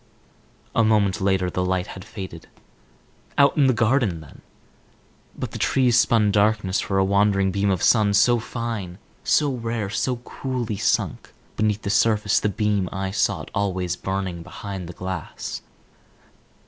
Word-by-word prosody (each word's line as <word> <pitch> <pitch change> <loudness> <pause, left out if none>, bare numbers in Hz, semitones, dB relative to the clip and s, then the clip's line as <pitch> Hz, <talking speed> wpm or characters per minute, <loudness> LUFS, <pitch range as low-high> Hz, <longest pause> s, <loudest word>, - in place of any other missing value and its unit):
A 115 - +3
moment 105 -2 +2
later 95 -1 +1
the 90 - -1
light 90 0 0
had 95 - -9
faded. 95 -6 -9 0.9
Out 140 0 +5
in 145 -3 +4
the - - +5
garden 115 -6 +1
then? 80 - -14 1.0
But - - -4
the - - -6
trees 125 -3 +3
spun 110 -3 +3
darkness 105 -2 +2
for 95 - -1
a 95 - +3
wandering 100 0 +2
beam 100 +1 0
of 95 -3 0
sun. 105 -3 +4
So 120 +3 +4
fine, 115 -6 -5 0.3
so 145 -3 +2
rare, 115 -4 -3 0.3
coolly 125 -7 -4
sunk - - -1 0.2
beneath 105 0 0
the 100 - -1
surface 105 -1 +3
the 105 - 0
beam 100 -2 0
I 95 -1 -3
sought - - -1
always 95 -3 -1
burnt 95 -3 -4
behind 95 0 -7
the - - -7
glass. 90 -3 -5
100 Hz, 150 wpm, -23 LUFS, 95-110 Hz, 1.0 s, Out